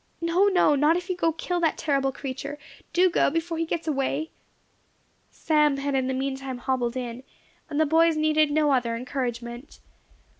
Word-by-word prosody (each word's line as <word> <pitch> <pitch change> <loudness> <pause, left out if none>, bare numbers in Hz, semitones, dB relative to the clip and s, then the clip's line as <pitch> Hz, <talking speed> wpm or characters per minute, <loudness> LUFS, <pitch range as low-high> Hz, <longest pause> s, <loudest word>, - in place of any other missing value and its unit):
"No, 345 +4 +2
no; 360 -6 +4
not 300 +4 +3
if 360 +1 -6
you - - -1
go 330 -2 +1
to 320 - -16
kill 355 +2 -2
that 325 -2 +1
terrible 275 -3 0
creature. 280 +2 -6 0.3
Do 365 +1 +4
go, 350 - +2
before 330 +2 -2
he 330 - -1
gets 330 0 -3
away." 285 +2 -1 1.0
Sam 300 -3 +2
had 280 +1 -2
in 260 -1 +1
the 260 - -1
meantime 265 -1 -3
hobbled 250 -1 -1
in, 245 -1 -5 0.5
and 290 - -2
the 315 - +4
boys 325 +1 +3
needed 310 0 +3
no 300 0 +2
other 240 -3 +1
encouragement. 240 0 -5
290 Hz, 180 wpm, -25 LUFS, 265-325 Hz, 1.0 s, no